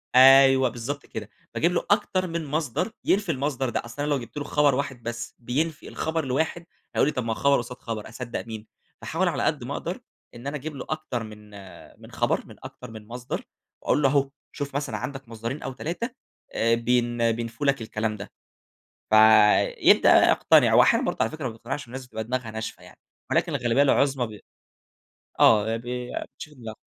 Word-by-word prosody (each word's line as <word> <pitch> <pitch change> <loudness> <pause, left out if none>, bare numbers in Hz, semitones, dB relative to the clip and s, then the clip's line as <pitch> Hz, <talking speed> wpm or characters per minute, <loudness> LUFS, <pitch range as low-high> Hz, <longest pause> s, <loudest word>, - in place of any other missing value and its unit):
أيوه 135 0 +7
بالضبط 125 +5 -5
كده، 110 -2 -7 0.3
باجِيب 170 +2 +2
له 175 - -1
أكتر 190 -3 +1
من 165 -1 -3
مَصدر 155 - -2
ينفِي 195 -3 +2
المَصدر 135 -2 -1
ده؛ 120 - -3
أصل 120 +5 -7
أنا 150 - -1
لو 145 - +1
جِبت 120 +2 -10
له 145 - -2
خبر 145 -1 +2
واحد 135 -3 -4
بس 120 0 -5
بينفِي 150 +7 -2
الخبر 160 -1 -2
الواحد 160 +6 -1 0.3
هيقول - - +3
لي: - - +2
"طيب 125 - -2
ما 115 - -1
هو - - -7
خبر 140 +3 +3
قصاد 120 +1 -5
خبر، 110 -2 -6
أصدق 120 0 -6
مين؟" 110 -1 -8 0.3
فأحاول - - -1
على - - -1
قد - - 0
ما - - -5
أقدر - - -4 0.4
إن 120 +3 -8
أنا 145 - -3
أجِيب 150 +2 -7
له 135 - -6
أكتر 155 -7 -3
من 105 -1 -12
آآ، 100 -2 -13
خبر - - 0
من - - -13
أكتر 125 - -10
من 110 -1 -11
مَصدر، 120 +1 -5 0.4
وأقول 150 - +1
له: 135 - +4
"أهو 140 -1 +2 0.2
شوف 140 -2 -6
مثلًا 140 -6 -2
عندك 135 +3 -6
مصدرين 115 +6 -5
أو 135 - -4
3 175 - -4 0.6
بين 120 0 +1
بينفُوا 115 +5 -4
لك 135 -3 +2
الكلام 110 0 -3
ده." 100 - -9 0.8
ف - - +1 0.6
يبدأ - - +6
بقى - - +4
يقتنِع، - - +4
وأحيانًا - - +5
برضه - - -2
على 110 - +1
فكرة 155 -4 -6
ما - - 0
بيقتنِعش، 120 +4 -6
الناس 130 +1 -8
بتبقى 110 -3 -5
دماغها 120 -1 -3
ناشفة 110 0 -6
يعني - - -16 0.3
ولكن - - +1
الغالبية 120 +3 +2
العظمى 135 -2 +2
ب 105 -1 -11 1.0
آه، 110 +1 +5
بي 125 +1 -5
بينشفوا 150 -1 -8
دماغهم. 110 -1 -7
125 Hz, 190 wpm, -25 LUFS, 115-145 Hz, 1.0 s, أيوه